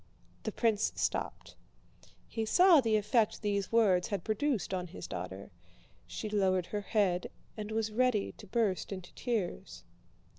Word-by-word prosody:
The - - -3
prince 225 -2 +1
stopped. - - -3 0.7
He 225 - -3
saw 350 - +6
the 225 -3 +2
effect 215 +1 +1
these 200 -2 -1
words 200 -6 +4
had 200 -5 -3
produced 220 -1 -1
on 180 -1 -2
his 175 - -8
daughter. - - -6 0.6
She 215 - -5
lowered 190 -4 +1
her 205 +2 -3
head 195 -4 +1 0.3
and 215 -1 -5
was 220 0 -1
ready 240 -2 +1
to 210 - -11
burst 205 -3 0
into 185 -2 -7
tears. 225 -8 -3
210 Hz, 145 wpm, -32 LUFS, 195-225 Hz, 0.7 s, saw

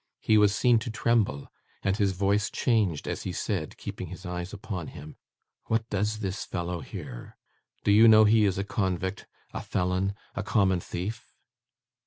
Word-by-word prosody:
He 110 - +2
was 105 -1 +5
seen 120 0 +4
to 115 - -5
tremble, 110 -10 +1 0.4
and 95 0 +1
his 100 -2 +1
voice 100 +2 +1
changed 105 - +1
as - - -3
he - - -4
said, - - -3
keeping - - -6
his 95 - -9
eyes 90 +1 -4
upon 100 -5 -5
him, 75 +2 -10 0.5
'What 115 0 0
does 105 +2 -1
this 95 0 -3
fellow 85 0 -3
here? - - -9 0.5
Do - - +3
you 110 +3 +7
know 110 -1 +8
he 110 0 +5
is 95 -2 +1
a 100 - 0
convict, 95 -4 -2 0.3
a - - -4
felon, 90 +2 -1 0.2
a 115 - -3
common 95 -3 +2
thief? 95 +7 -6
100 Hz, 170 wpm, -27 LUFS, 90-110 Hz, 0.5 s, know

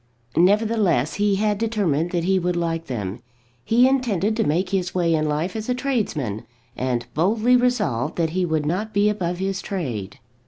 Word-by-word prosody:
Nevertheless 200 - +2
he 205 -1 +3
had 210 0 0
determined 195 -9 0
that 175 -1 -1
he 190 +1 +2
would 180 0 -1
like 165 -1 -2
them. 105 -6 -4 0.4
He 240 - +4
intended 225 -6 +1
to 225 - +1
make 175 +5 0
his 185 -2 -1
way 170 -2 +2
in 155 -1 +1
life 155 +6 -2
as 220 +2 -4
a 250 - +1
tradesman, 195 - -2 0.3
and 125 -2 -1
boldly 215 +9 +3
resolved 205 - +1
that 165 -2 0
he 185 +2 0
would 160 -3 0
not 205 +7 -2
be 205 +1 +4
above 180 -4 -2
his 190 +1 -2
trade. 120 - -4
185 Hz, 180 wpm, -22 LUFS, 155-215 Hz, 0.4 s, He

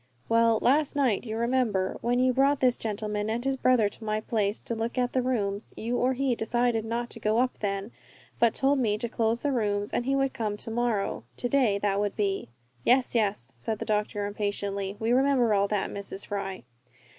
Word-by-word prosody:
"Well, 230 0 +4
last 290 +3 +3
night, 255 -6 +1
you 220 -1 -4
remember, 235 -6 0
when 240 +1 +1
you 255 0 +3
brought 275 +2 +3
this 250 -1 +4
gentleman 210 -1 -3
and 235 +3 -2
his 270 0 +1
brother 255 -4 +3
to 215 - -9
my 215 0 -1
place 215 -1 -1
to - - -4
look 230 +2 -3
at 245 -1 0
the 255 - +2
rooms. 210 -5 -2
You 235 +2 -2
or 255 +2 +2
he 265 0 0
decided 235 0 0
not 235 +1 -3
to 230 - -7
go 215 0 +1
up 250 +1 +1
then, 200 +1 -2 0.5
but 235 -1 +3
told 275 +1 +2
me 215 -4 +1
to 235 +2 -2
close 230 0 0
the 290 - 0
rooms, 205 -4 0
and 240 - -1
he 275 - +2
would 270 -1 +1
come 210 -2 -2
to 225 - -5
morrow 230 -3 -1
to 245 - -1
day 245 -6 +3
that 200 -1 0
would 205 -1 -1
be." 195 - -1 0.3
"Yes, 250 - +3
yes!" 210 - 0
said 210 - -3
the - - -5
doctor, 210 -1 -1
impatiently, 200 -1 -3
"we 225 +1 0
remember 255 -3 +3
all 200 0 +3
that, 205 -1 -1
Mrs. 200 0 -6
Fry." 195 -2 -4
225 Hz, 210 wpm, -27 LUFS, 205-250 Hz, 0.5 s, Well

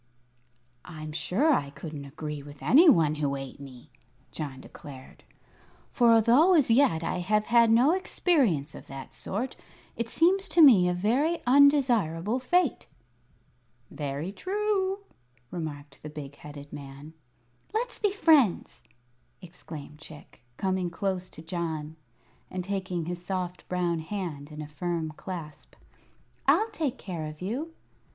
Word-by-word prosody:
"I'm 155 -3 -8
sure 220 - +1
I 140 - 0
couldn't 145 0 -8
agree 150 +1 -6
with 145 0 -13
any 320 +7 +7
one 160 - +4
who 140 -1 0
ate 135 0 -7
me," 130 -3 -12 0.4
John 140 -4 -6
declared. 135 -1 -12 0.7
"For, 240 -2 +4
although 245 - +5
as 285 -7 +4
yet 225 - +3
I 175 +2 -2
have 210 +4 +1
had 235 -1 +5
no 240 +7 +5
experience 265 - +1
of - - -11
that 135 -1 -9
sort, 235 +7 -4 0.4
it 235 -1 -3
seems 375 +7 +2
to 340 - +4
me 200 -11 +7
a - - +1
very 260 - +1
undesirable 245 - +3
fate." 340 +3 +1 1.0
"Very 145 +4 -4
true," 390 - -1 0.5
remarked 145 -4 -7
the 150 - -7
big 145 -2 -8
headed 145 -1 -11
man. 140 +2 -10 0.6
"Let's 480 +3 -2
be 415 - +2
friends!" 310 - +3 0.6
exclaimed 160 -5 -11
Chick, 155 -5 -14 0.2
coming 190 -2 -1
close 185 +1 -3
to 160 - -12
John 160 -2 -4 0.5
and 185 -1 -4
taking 185 -3 -3
his 175 +1 -5
soft 180 -1 -4
brown 175 -2 0
hand 160 -5 -5
in 150 0 -7
a - - -8
firm 160 +1 -3
clasp. 160 -2 -9 0.7
"I'll 445 +1 +4
take 280 -5 -2
care 170 -5 -5
of 155 0 -9
you." 270 - -4
180 Hz, 135 wpm, -27 LUFS, 150-250 Hz, 1.0 s, any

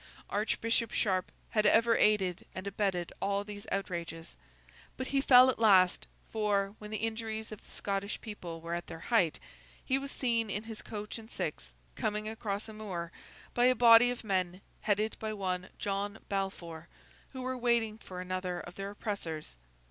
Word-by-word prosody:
Archbishop 225 +2 +1
Sharp 185 -3 0 0.2
had 215 - +3
ever 230 0 +5
aided 190 -5 +3
and 185 - -5
abetted 195 -3 -1
all 200 0 +1
these 205 +1 -8
outrages. 170 -4 -3 0.6
But 260 - -3
he 275 -1 +2
fell 255 -1 +8
at - - -8
last; 190 -5 +5 0.2
for, 205 -2 +1
when 210 - -8
the 215 - -2
injuries 220 -1 -3
of 215 - -9
the - - -20
Scottish 200 0 -2
people 175 -7 -7
were 170 +1 -4
at 175 0 -3
their - - -7 0.2
height, 175 -9 +4 0.5
he 265 +1 +2
was 275 0 -6
seen, 230 -4 +1
in 205 +2 -2
his 225 -1 -7
coach 210 +1 -6
and 220 0 -12
six 60 - -4 0.2
coming 210 - -1
across 215 -1 -3
a 220 - -8
moor, 185 -6 -5 0.4
by 245 - +4
a 255 0 +5
body 235 0 +8
of 245 -1 -4
men, 185 -3 0 0.2
headed 215 +1 0
by 220 -1 -3
one 185 -3 -2
John 200 +1 -2
Balfour, 175 -5 -3 0.5
who 260 -1 -5
were 255 0 -1
waiting 235 -3 +1
for 180 -3 -7
another 185 -1 -2
of 175 - -9
their 195 +1 -5
oppressors. 200 - -4
205 Hz, 170 wpm, -32 LUFS, 185-225 Hz, 0.6 s, fell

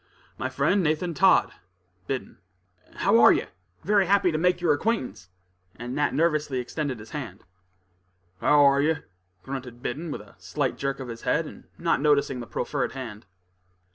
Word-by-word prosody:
"My - - -3
friend, 200 - +2
Nathan 165 +2 0
Todd, 190 +4 +4 0.6
Biddon." 130 -7 -4 0.6
"How - - +3
are - - +8
you? - - +1 0.4
Very 200 0 +3
happy 195 -2 +3
to 155 - -1
make 180 +1 +2
your 170 -3 +3
acquaintance," 145 - -2 0.5
and 120 +2 -6
Nat 145 +1 +1
nervously 150 -4 +1
extended 130 +1 -3
his 105 0 -12
hand. 150 -3 -7 1.0
"How're 140 -1 +5
yer?" 155 +1 0 0.4
grunted 130 -3 -7
Biddon, 155 +7 -4
with 145 - -5
a 105 - -17
slight 125 +9 -2
jerk 135 0 -3
of 130 - -6
his 115 -1 -7
head, - - +1
and - - -11
not - - +1
noticing 140 -3 +2
the 120 - -7
proffered 135 +2 -2
hand. 115 -5 -8
145 Hz, 160 wpm, -26 LUFS, 125-160 Hz, 1.0 s, are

